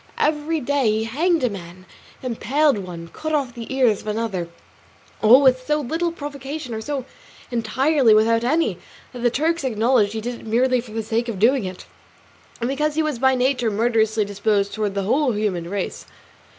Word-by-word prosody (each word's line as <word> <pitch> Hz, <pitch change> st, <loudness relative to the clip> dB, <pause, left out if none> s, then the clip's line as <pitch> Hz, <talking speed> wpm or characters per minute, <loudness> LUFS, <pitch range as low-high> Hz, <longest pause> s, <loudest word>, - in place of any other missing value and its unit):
Every 310 Hz, +1 st, 0 dB
day 280 Hz, -3 st, +1 dB
he 215 Hz, +1 st, +1 dB
hanged 315 Hz, +8 st, +1 dB
a 250 Hz, -, +3 dB
man, 185 Hz, -1 st, -10 dB, 0.4 s
impaled 260 Hz, +2 st, +1 dB
one, 170 Hz, -3 st, -8 dB
cut 315 Hz, -, -3 dB
off 270 Hz, -5 st, -1 dB
the 235 Hz, +1 st, -8 dB
ears 250 Hz, -6 st, +2 dB
of -, -, -14 dB
another; 210 Hz, -5 st, -2 dB
and -, -, -23 dB, 0.8 s
all 265 Hz, +3 st, +9 dB
with 255 Hz, -1 st, +3 dB
so 300 Hz, 0 st, +2 dB
little 325 Hz, +5 st, -1 dB
provocation, 285 Hz, -3 st, -6 dB
or 220 Hz, -, -4 dB
so 275 Hz, +1 st, -4 dB, 0.5 s
entirely 240 Hz, +2 st, +3 dB
without 230 Hz, +2 st, +3 dB
any, 245 Hz, -, +1 dB, 0.3 s
that 250 Hz, -, -7 dB
the 240 Hz, 0 st, +2 dB
Turks 320 Hz, +6 st, 0 dB
acknowledged 225 Hz, -3 st, +2 dB
he 220 Hz, -, -3 dB
did 240 Hz, +1 st, -5 dB
it -, -, -12 dB
merely 250 Hz, +2 st, +2 dB
for 230 Hz, -2 st, -13 dB
the 225 Hz, 0 st, -2 dB
sake 230 Hz, +2 st, -1 dB
of 220 Hz, -, -4 dB
doing 235 Hz, +3 st, +3 dB
it, 185 Hz, 0 st, -7 dB, 0.7 s
and 235 Hz, -, -1 dB
because 300 Hz, +3 st, -1 dB
he 315 Hz, -, +2 dB
was 300 Hz, -6 st, -2 dB
by 265 Hz, +1 st, +4 dB
nature 250 Hz, -2 st, +1 dB
murderously 220 Hz, 0 st, +1 dB
disposed 200 Hz, 0 st, 0 dB
towards 210 Hz, -2 st, -2 dB
the 200 Hz, -, -1 dB
whole 260 Hz, +5 st, +2 dB
human 190 Hz, -5 st, -2 dB
race. 200 Hz, -1 st, -4 dB
240 Hz, 190 wpm, -22 LUFS, 215-280 Hz, 0.8 s, all